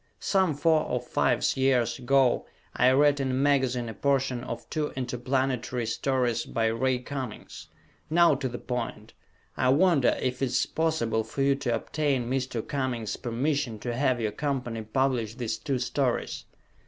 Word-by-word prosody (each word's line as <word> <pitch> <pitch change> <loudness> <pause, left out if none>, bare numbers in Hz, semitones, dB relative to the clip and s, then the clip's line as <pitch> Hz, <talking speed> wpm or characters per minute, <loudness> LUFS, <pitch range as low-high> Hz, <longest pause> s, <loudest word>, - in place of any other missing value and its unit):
Some 190 -6 +1
four 155 +2 +3
or - - -1
fives - - +1
years 130 -2 +2
ago 130 0 +2 0.3
I 125 - +5
read 145 +2 +4
in 135 -1 -1
a - - -1
magazine 130 -3 +1
a 110 - -5
portion 135 0 0
of 120 -2 -6
two 155 -2 -1
interplanetary 125 -1 -1
stories 120 0 0
by 115 - -1
Ray 125 +3 +1
Cummings. 130 -2 -7 0.4
Now 170 0 +5
to 135 -1 -2
the 120 - -5
point, 115 -4 -5 0.4
I 125 - +2
wonder 145 -2 +4
if 125 0 -2
it - - +3
is 125 - +1
possible 120 -9 0
for 125 +5 -3
you 140 0 +4
to 135 -4 -1
obtain 135 0 -1
Mr. 125 -3 -2
Cummings' 130 -6 -2
permission 130 0 -1
to 120 +3 -4
have 130 0 +1
your 110 -2 -1
company 125 -2 -3
publish 115 -1 0
these 115 -3 -3
two 140 -3 -1
stories? 130 0 -1
130 Hz, 160 wpm, -27 LUFS, 120-140 Hz, 0.4 s, I